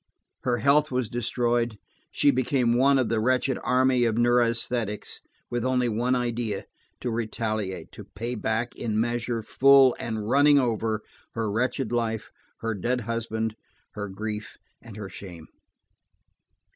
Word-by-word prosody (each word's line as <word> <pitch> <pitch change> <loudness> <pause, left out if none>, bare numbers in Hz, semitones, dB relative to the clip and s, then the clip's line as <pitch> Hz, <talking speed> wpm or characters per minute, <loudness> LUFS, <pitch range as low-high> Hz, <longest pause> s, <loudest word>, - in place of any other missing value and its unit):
Her 120 -1 0
health 145 +3 +3
was 125 -4 -1
destroyed; 120 -1 0 0.3
she 145 - +3
became 125 -2 +1
one 135 +3 +4
of 130 -3 +2
the 110 0 0
wretched 130 +3 +1
army 130 -1 +3
of 115 -2 +1
neurasthenics, 120 -2 +1 0.3
with 120 -1 -1
only 125 -1 +1
one 120 +4 +1
idea: 120 -4 -2 0.4
to 125 - -2
retaliate, 110 -3 -3
to - - -11
pay 115 +4 -5
back 115 +1 -2
in 110 -3 -2
measure 120 0 -1
full 135 +1 +6
and 110 -2 -3
running 145 +4 +5
over, 115 -4 0 0.3
her 110 -2 -1
wrecked 125 +2 -1
life, 115 -2 -1 0.3
her 115 0 -1
dead 125 +5 -1
husband, 110 -1 -3 0.4
her 105 -1 -5
grief 105 +2 -5 0.2
and 115 -3 -11
her 105 -2 -6
shame. 90 -4 -10
120 Hz, 140 wpm, -26 LUFS, 110-125 Hz, 0.4 s, full